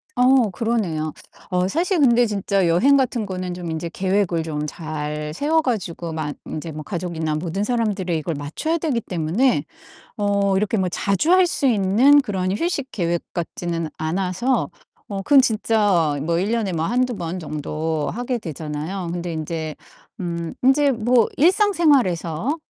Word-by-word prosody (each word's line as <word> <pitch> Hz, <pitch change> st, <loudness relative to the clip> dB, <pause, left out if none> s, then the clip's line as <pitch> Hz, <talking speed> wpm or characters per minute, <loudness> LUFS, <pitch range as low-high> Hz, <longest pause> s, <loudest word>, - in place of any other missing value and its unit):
어 250 Hz, -3 st, +4 dB
그러네요. 180 Hz, -8 st, -1 dB, 0.4 s
어 180 Hz, 0 st, +1 dB
사실 345 Hz, -, 0 dB
근데 245 Hz, -4 st, +5 dB
진짜 200 Hz, -2 st, 0 dB
여행 235 Hz, +13 st, +4 dB
같은 250 Hz, -4 st, 0 dB
거는 185 Hz, -2 st, -4 dB
좀 175 Hz, -1 st, -6 dB
인제 160 Hz, +1 st, -3 dB
계획을 185 Hz, -3 st, 0 dB
좀 150 Hz, -2 st, -3 dB
잘 150 Hz, -1 st, -5 dB
세워 310 Hz, -, +2 dB
가지고 175 Hz, -, -3 dB
만 150 Hz, -3 st, -3 dB
인제 160 Hz, +1 st, -5 dB
뭐 155 Hz, 0 st, -7 dB
가족이나 170 Hz, -4 st, -3 dB
모든 175 Hz, +5 st, -2 dB
사람들이 205 Hz, -8 st, 0 dB
이걸 160 Hz, +1 st, -3 dB
맞춰야 155 Hz, -, -2 dB
되기 295 Hz, -8 st, -1 dB
때문에 175 Hz, -, 0 dB, 0.5 s
어 200 Hz, -1 st, +1 dB
이렇게 210 Hz, +3 st, +1 dB
뭐 185 Hz, -1 st, +1 dB
자주 200 Hz, -, 0 dB
할 370 Hz, 0 st, +6 dB
수 290 Hz, -, 0 dB
있는 240 Hz, +6 st, +5 dB
그런 185 Hz, -5 st, -2 dB
휴식 290 Hz, -2 st, -2 dB
계획 170 Hz, -3 st, -1 dB
같지는 170 Hz, -1 st, -3 dB
않아서 185 Hz, +10 st, 0 dB, 0.4 s
어 200 Hz, -, -4 dB
그건 275 Hz, +6 st, +6 dB
진짜 205 Hz, -, +2 dB
뭐 165 Hz, +2 st, 0 dB
1 195 Hz, +4 st, 0 dB
년에 220 Hz, -5 st, 0 dB
뭐 165 Hz, -1 st, -1 dB
1-2 250 Hz, +2 st, +1 dB
번 170 Hz, +1 st, -4 dB
정도 155 Hz, -1 st, -3 dB
하게 245 Hz, +2 st, -2 dB
되잖아요. 160 Hz, -, -5 dB
근데 175 Hz, 0 st, -4 dB
인제 160 Hz, 0 st, -4 dB, 0.5 s
음 170 Hz, -2 st, -4 dB
인제 275 Hz, +2 st, +4 dB
뭐 235 Hz, 0 st, +3 dB
일상생활에서 290 Hz, -, +2 dB
190 Hz, 290 characters per minute, -22 LUFS, 165-240 Hz, 0.5 s, 할